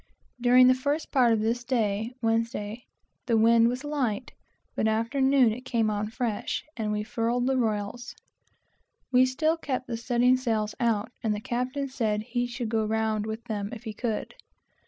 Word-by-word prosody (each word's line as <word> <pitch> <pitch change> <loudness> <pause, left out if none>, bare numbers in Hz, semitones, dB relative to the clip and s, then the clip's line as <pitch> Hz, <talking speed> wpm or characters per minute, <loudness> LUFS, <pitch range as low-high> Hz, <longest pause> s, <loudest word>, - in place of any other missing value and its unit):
During 250 +1 +6
the 255 - +7
first 285 +5 -2
part 250 -4 +4
of 220 -2 +2
this 230 +3 0
day 220 -3 0
(Wednesday) 225 0 -1 0.4
the 230 -2 +3
wind 230 +1 +5
was 250 +3 -2
light, 270 -8 -2 0.4
but 220 - +1
after 230 +5 0
noon 265 -4 +4
it 245 - -7
came 230 -4 0
on 210 0 -2
fresh, 225 -2 -3
and 215 -2 -2
we 210 0 -1
furled 235 +2 -1
the 265 +1 +1
royals. 225 0 -2 1.0
We 255 0 +5
still 310 +5 +1
kept 260 -5 -3
the 235 -2 -4
studding 245 +2 +3
sails 220 -4 -1
out, 230 -1 0
and 220 -3 0
the - - -4
captain 250 +5 -2
said 220 -5 -1
he 245 +1 -2
should 240 -1 -4
go 220 -1 +1
round 220 0 0
with 220 +1 -5
them, 205 -4 -4
if 235 - -8
he 220 -3 -5
could. 220 0 -3
235 Hz, 175 wpm, -27 LUFS, 220-255 Hz, 1.0 s, the